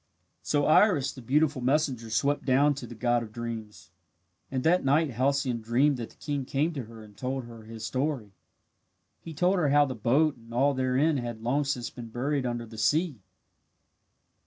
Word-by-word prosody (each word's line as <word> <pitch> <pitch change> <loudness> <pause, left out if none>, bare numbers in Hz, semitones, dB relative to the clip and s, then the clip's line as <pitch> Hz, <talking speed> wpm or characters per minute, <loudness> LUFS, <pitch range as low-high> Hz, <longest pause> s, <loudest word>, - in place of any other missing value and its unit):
So 145 -1 +1
Iris, 155 -4 +4
the 130 - -10
beautiful 140 +3 +1
messenger, 130 -3 0
swept 140 +7 +1
down 140 +3 +3
to 130 -3 -8
the 120 - -10
god 120 +1 +1
of 110 -2 -8
dreams 115 -2 -7 0.6
and 130 -1 -2
that 180 +3 +3
night 145 +2 +2
Halcyone 130 -1 0
dreamed 130 +5 +2
that 115 -2 -6
the - - -20
king 145 -2 -3
came 145 +6 -1
to 135 -6 -5
her 110 0 -12
and 105 -1 -16
told 130 +2 -3
her 115 -2 -12
his 110 0 -8
story. 130 -4 -2 0.9
He 165 -2 -9
told 180 +5 +2
her 150 -4 +2
how 145 +1 +5
the 135 - -4
boat 130 +6 +2
and 115 0 -16
all 140 +3 +3
therein 130 +4 +1
had 120 -3 -5
long 140 +5 +1
since 125 -4 -2
been 120 -1 -9
buried 130 +3 -1
under 120 -1 -3
the 110 -1 -10
sea. 150 - +1
130 Hz, 185 wpm, -28 LUFS, 115-145 Hz, 0.9 s, how